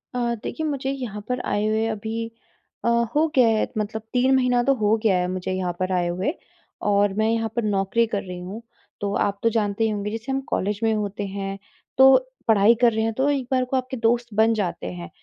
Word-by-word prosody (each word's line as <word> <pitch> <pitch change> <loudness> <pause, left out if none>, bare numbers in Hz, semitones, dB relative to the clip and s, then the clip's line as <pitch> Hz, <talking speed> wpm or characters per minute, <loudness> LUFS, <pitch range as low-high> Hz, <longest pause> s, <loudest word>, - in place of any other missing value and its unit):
अ, 235 -1 0
देखिए 315 - -3
मुझे 270 -2 -2
यहाँ 235 -7 -5
पर 250 0 0
आए 205 +1 0
हुए 220 +1 +1
अभी 225 +1 -4 0.5
अ, - - +2 0.3
हो 315 +2 +4
गया 250 -3 +6
है 220 -1 +2
मतलब 215 +1 -2
3 260 +2 +3
महीना 250 -2 +3
तो 275 - +3
हो 215 -2 +2
गया 195 -4 +3
है 180 0 0
मुझे 185 0 -3
यहाँ 185 -1 -1
पर 185 0 -1
आए 175 -1 +1
हुए 185 - -1 0.6
और 200 -1 +3
मैं 220 +2 +1
यहाँ 225 -1 0
पर 235 - 0
नौकरी 205 +2 +1
कर 205 -2 -2
रही 180 -1 -7
हूँ 195 +6 -7 0.4
तो 200 0 -1
आप 200 0 0
तो 230 - +4
जानते 215 -1 0
ही 220 - +2
होंगे 210 0 -3
जैसे 225 +4 -5
हम 270 - 0
कॉलेज 205 +2 -1
में 225 0 +3
होते 205 -1 -3
हैं, 195 0 -4 0.4
तो 265 0 +8 0.3
पढ़ाई 220 +1 +5
कर 240 - +6
रहे 220 - 0
हैं 225 0 0
तो 265 +5 +1
एक 270 -4 -1
बार 255 -1 +2
को 260 +1 -1
आपके 255 +1 -3
दोस्त 235 0 0
बन 220 +2 +4
जाते 195 - -2
हैं, 85 -1 -8
220 Hz, 230 wpm, -23 LUFS, 200-240 Hz, 0.6 s, तो